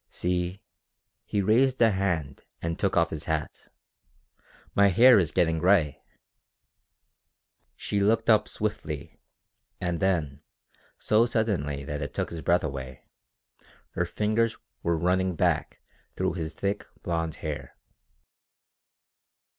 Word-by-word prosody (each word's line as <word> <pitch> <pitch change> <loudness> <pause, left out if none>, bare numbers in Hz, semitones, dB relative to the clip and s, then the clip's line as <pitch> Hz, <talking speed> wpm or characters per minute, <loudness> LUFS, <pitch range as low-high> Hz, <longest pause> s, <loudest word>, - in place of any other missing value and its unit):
"See...." 90 +1 -2 0.6
He 100 -1 -1
raised 125 +6 +3
a 115 -2 +5
hand 85 -8 -2 0.2
and 85 0 -3
took 100 -3 +1
off 85 0 +3
his 80 -1 -5
hat. 80 -2 -4 1.0
"My 100 0 +5
hair 115 +5 +7
is 85 -4 +1
getting 80 -1 +1
gray!" 90 -5 +3 1.7
She 100 - -2
looked 110 +3 +2
up 110 -2 +4
swiftly, 75 -8 -4 0.6
and 85 -2 -2
then, 80 -7 0 0.6
so 110 +2 +3
suddenly 85 - -1
that 75 +1 -4
it 70 0 -5
took - - -2
his 85 -1 -6
breath 85 +5 +2
away, 65 -4 -6 0.9
her 90 - -1
fingers 110 +4 0 0.2
were 85 -1 0
running 90 +2 +1
back - - 0 0.3
through 95 0 0
his 80 -2 -5
thick 100 +1 -2 0.2
blond 80 -2 -2
hair. 75 -2 -5
90 Hz, 120 wpm, -27 LUFS, 80-100 Hz, 1.7 s, hair